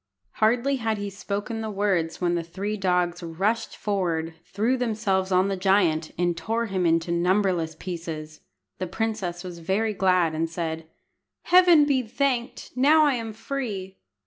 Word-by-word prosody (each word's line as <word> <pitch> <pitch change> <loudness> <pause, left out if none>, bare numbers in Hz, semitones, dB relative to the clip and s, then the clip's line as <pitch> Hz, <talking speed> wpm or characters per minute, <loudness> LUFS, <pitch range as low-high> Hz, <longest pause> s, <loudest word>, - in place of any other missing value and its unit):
Hardly 240 +5 +2
had 225 -3 -1
he 205 0 -4
spoken 205 +3 -4
the 220 - -3
words 195 -5 0
when 175 -1 +1
the 170 - 0
three 190 +6 -4
dogs 180 -2 0
rushed 190 +7 -2
forward, 170 -5 -1 0.2
threw 220 +6 +1
themselves 210 -6 0
on 185 +1 +3
the 195 - -1
giant, 185 -5 +2
and 175 0 +1
tore 225 +8 -1
him 190 -4 0
into 165 +1 +1
numberless 175 -2 +1
pieces. 160 -3 -6 0.4
The 185 - -2
princess 190 -3 -3
was 175 -2 -8
very 200 +6 0
glad, 185 -4 +2
and 160 +1 -1
said 160 -1 -4 0.6
"Heaven 350 -4 +6
be 275 -3 +2
thanked! 250 +1 -2
Now 300 +4 +5
I 290 - +3
am 230 -3 -3
free." 210 -6 -5
190 Hz, 155 wpm, -25 LUFS, 170-225 Hz, 0.6 s, Heaven